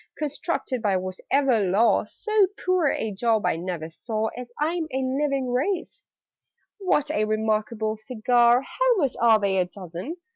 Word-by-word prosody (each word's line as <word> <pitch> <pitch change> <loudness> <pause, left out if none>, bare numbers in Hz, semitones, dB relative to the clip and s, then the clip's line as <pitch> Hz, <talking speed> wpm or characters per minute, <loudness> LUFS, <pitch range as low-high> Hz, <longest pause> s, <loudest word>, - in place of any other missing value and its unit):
Constructed 290 -3 -3
by 200 -4 +2
whatever 225 +7 0
law, 205 +3 +3
So 430 - +1 0.2
poor 365 -4 +3
a 220 - -2
job 220 +1 +1
I - - +2
never 165 -2 -5
saw, 220 +5 -3
As 245 0 -8
I'm 325 +2 0
a 265 - -2
living 265 0 -1
Wraith! 330 +9 -2 0.8
"What 300 -6 +1
a 215 - +1
re 215 0 0
markable 215 0 -1
cigar! 240 +2 +3
How - - +1
much 280 - +1
are 225 -2 +6
they 195 -2 +1
a 180 - +2
dozen?" 180 - -7
235 Hz, 155 wpm, -25 LUFS, 210-285 Hz, 0.8 s, are